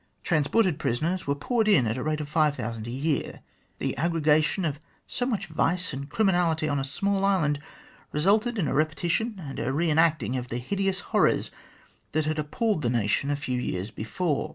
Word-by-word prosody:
Transported 165 +3 +2
prisoners 165 +10 -1
were 140 - +1
poured 220 - 0
in 170 - +5
at 110 0 0
the 130 - -3
rate 155 +2 -1
of 150 - -5
five 150 -1 +2
thousand 115 -3 -5
a - - -5
year. 140 +4 -2 0.4
The - - -2
aggregation 155 +2 +2
of 150 -2 -2 0.3
so 245 - -2
much 215 -6 -1
vice 165 +1 0
and 140 +2 -6
criminality 175 -5 +2
on 145 -1 0
a - - -1
small 195 +8 -1
island 165 -8 +2 0.5
resulted 215 +9 +2
in 175 -7 +1
a - - -1
repetition 170 - 0
and 140 -6 -6
a 130 - -1
re 160 +4 +1
enacting 155 -4 +2
of 125 0 -4
the 120 - -3
hideous 195 +8 -1
horrors - - +3 0.6
that 155 0 +1
had 155 0 -1
appalled 165 +5 0
the 120 - +1
nation 115 +3 +1
a 145 - +1
few 130 -4 -2
years 95 -1 -3
before. 145 - -2
155 Hz, 190 wpm, -27 LUFS, 140-185 Hz, 0.6 s, in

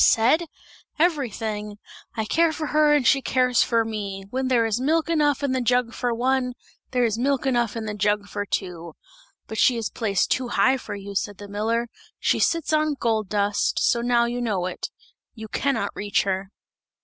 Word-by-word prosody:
"Said? 265 +10 +4 0.5
Everything. 220 - -1 0.4
'I 220 - 0
care 330 +8 +2
for 315 0 -4
her 305 -1 +5
and 285 -4 +1
she 275 +3 +4
cares 250 -2 +2
for 230 -1 +2
me! 200 -3 -5
When 260 +1 -1
there 240 -3 +3
is 225 +2 -1
milk 320 +4 +1
enough 295 -3 +2
in 280 - +1
the 260 -1 0
jug 245 -1 +1
for 245 -1 -1
one, 250 +1 0 0.4
there 250 -1 +1
is 225 -1 0
milk 275 +1 0
enough 240 -4 +1
in 225 -1 -4
the 210 - -3
jug 205 0 0
for 205 0 -3
two!' 170 -4 -4 0.5
'But 220 - -6
she 245 - +4
is 225 -2 -3
placed 205 -5 0
too 255 -1 +1
high 240 +3 +3
for 235 - -7
you,' 200 0 -8
said 200 0 -2
the 205 - -9
miller, 225 +4 -1 0.3
'she - - +1
sits 330 -2 +1
on 305 -1 +2
gold 220 -4 0
dust, 205 -1 0
so 235 - +2
now 240 0 +3
you 240 +1 -3
know 205 -7 -1
it; 185 - -4 0.5
you 220 -1 -8
can 275 +5 0
not 200 - -2
reach 205 -1 0
her!' 190 0 -2
235 Hz, 195 wpm, -24 LUFS, 210-260 Hz, 0.5 s, her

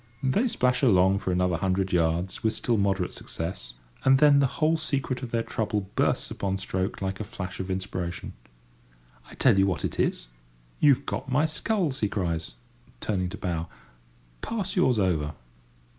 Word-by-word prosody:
They 200 - +2
splash 125 - +1
along 95 -6 +4
for 95 -2 -2
another 90 -1 +1
hundred 95 +1 0
yards 85 +2 +1
with 110 -1 +1
still 115 +1 0
moderate 100 -3 0
success, 80 -8 -5 0.3
and 135 0 +6
then 145 0 +6
the 140 - +4
whole 160 +1 +3
secret 140 -5 -2
of 125 - -5
their 115 0 0
trouble 105 -4 -2
bursts - - +1
upon 95 -1 -2
stroke 95 +1 -3
like 95 0 -3
a - - -2
flash 95 -2 -7
of 95 0 -4
inspiration. 95 -2 -4 1.0
"I - - -12
tell 95 - +4
you 95 - +4
what 95 - -1
it - - -4
is: - - 0 0.5
you've 140 -1 +4
got 135 - -4
my 145 +5 +3
sculls," 160 - -1
he 105 - +1
cries, 85 - -2 0.4
turning 90 - -1
to 100 - -7
bow; 85 -3 -3 0.7
"pass 200 -4 -3
yours 130 - +3
over." 80 -7 0
100 Hz, 170 wpm, -27 LUFS, 90-130 Hz, 1.0 s, and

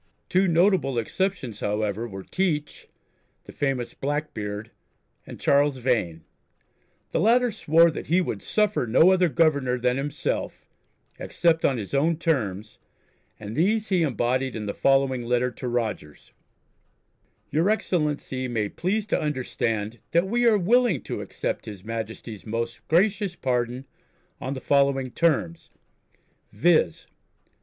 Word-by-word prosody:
Two 190 +1 +3
notable 170 -6 +2
exceptions, 130 - -2
however, 105 +2 -2
were 95 -3 -8
Teach, 155 - -2 0.6
the - - -12
famous 135 -4 -2
"Blackbeard," 110 -8 -4 0.6
and - - -9
Charles 140 -1 +3
Vane. 105 -11 -1 0.9
The - - 0
latter 240 +2 +3
swore 165 -2 +4
that 155 - -7
"he 175 +4 +3
would 185 - -2
suffer 210 - 0
no 160 +11 +5
other 185 -2 +3
governor 140 -6 +2
than 125 +1 0
himself" 140 +1 -3 0.5
except 165 -1 +1
on 135 - +2
his 105 0 -6
own 155 +4 +2
terms, 110 - -2 0.6
and 105 +1 -7
these 210 +7 +1
he 185 -3 +2
embodied 130 -2 0
in 110 -1 -4
the 100 - -3
following 135 -2 +2
letter 125 +1 +1
to 125 - -7
Rogers: 110 -11 -4 1.2
"Your 160 +7 +2
excellency 150 -10 -1
may 110 -4 -1
please 200 - -1
to 215 - 0
understand 120 -6 -2
that 170 +2 +4
we 240 +4 +2
are 220 -2 +5
willing 215 - +2
to - - -5
accept - - -4
His 100 -3 -9
Majesty's 115 -1 -6
most 115 +1 -4
gracious 195 +2 +2
pardon 125 -1 -2 0.5
on 135 +2 -4
the 130 - -6
following 140 -2 +2
terms, 110 - 0 0.8
viz. 155 - +2
135 Hz, 130 wpm, -25 LUFS, 115-170 Hz, 1.2 s, no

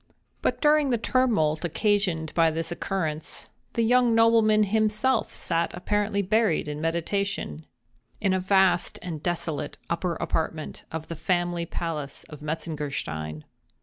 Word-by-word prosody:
But - - 0
during 300 -1 +4
the 240 - +2
tumult 215 -11 +2
occasioned 180 -3 0
by 165 -1 +4
this 165 +1 -2
occurrence, 165 -4 -3 0.2
the 230 - +1
young 245 0 +4
nobleman 225 -2 +5
himself 220 +4 +1
sat 165 0 0
apparently 200 +2 0
buried 210 -6 +2
in 150 0 -4
meditation, 165 - -2 0.5
in 195 -3 +2
a 190 - +2
vast 190 -1 +3
and 165 -4 -5
desolate 160 -4 -2
upper 170 0 0
apartment 160 -1 -3
of 160 -1 -5
the 165 - -5
family 175 +1 0
palace 155 -5 -4
of 150 -2 -10
Metzengerstein. 145 - -4
175 Hz, 130 wpm, -26 LUFS, 160-210 Hz, 0.5 s, nobleman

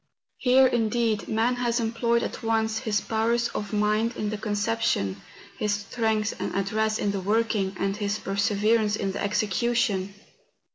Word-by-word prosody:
Here, 260 +1 +5
indeed, 230 -3 +1
man 230 +3 +1
has 240 0 0
employed 235 +1 +1
at - - -5
once 220 -1 0
his 210 -4 0
powers 230 +2 0
of 205 -1 -5
mind 215 +2 +1
in 210 0 -2
the 215 - -3
conception, 205 - -1 0.4
his 210 -1 +1
strength 215 +1 -1
and - - -3
address 215 +3 0
in 205 - 0
the 200 -1 -3
working, 205 -1 0
and 195 0 0
his 205 0 -1
per¬ 195 -1 -4
severance 210 +1 +2
in 195 -2 -2
the - - -5
execution. 205 -1 0
215 Hz, 155 wpm, -26 LUFS, 205-230 Hz, 0.4 s, Here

